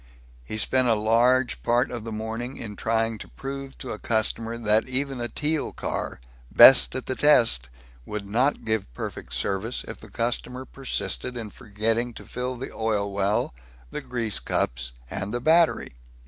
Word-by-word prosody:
He 110 - -5
spent 130 +4 +2
a 115 - +4
large 120 +4 +3
part 120 +2 +2
of 120 -3 -5
the 115 - -5
morning 110 +4 -4
in 105 -3 -7
trying 115 0 0
to - - -8
prove 135 0 -7
to 130 - -6
a 105 - -5
customer 115 +1 -1
that 110 +1 +2
even 135 -1 -1
a 120 - -1
Teal 155 +5 -1
car, - - -4 0.3
best 135 - +8
at 130 - -3
the 130 - -2
test, 115 - +4 0.3
would 105 +6 -5
not 125 +8 +1
give 110 - -1
perfect - - -6
service 100 +5 -2
if - - -7
the - - -13
customer 125 +2 -2
persisted 130 -2 -3
in 110 -3 -5
forgetting 115 +2 -1
to - - -10
fill 125 +1 -4
the 130 - -6
oil 105 -2 0
well, 100 -7 +1 0.4
the - - -4
grease 115 -4 -3
cups, 60 0 -1 0.2
and 95 +1 -3
the 120 - -1
battery. 160 - +3
115 Hz, 170 wpm, -26 LUFS, 110-130 Hz, 0.4 s, best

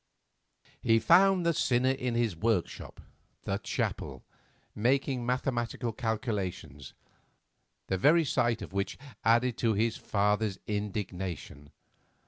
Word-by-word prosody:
He 115 - +4
found 180 - +5
the 170 - +3
sinner 130 -2 +2
in 125 -2 -2
his 115 -6 +1
workshop, 100 0 -2 0.4
the - - -2
chapel, 65 -2 -3 0.5
making 130 +2 +1
mathematical 120 -2 -1
calculations, 100 - -4 0.9
the 95 - -2
very 160 - +5
sight 120 -4 +1
of - - -9
which 100 0 -2 0.3
added 115 +2 +3
to 115 -3 +2
his 115 +2 +1
father's 105 0 0
indignation. 95 -8 -4
115 Hz, 110 wpm, -30 LUFS, 100-125 Hz, 0.9 s, found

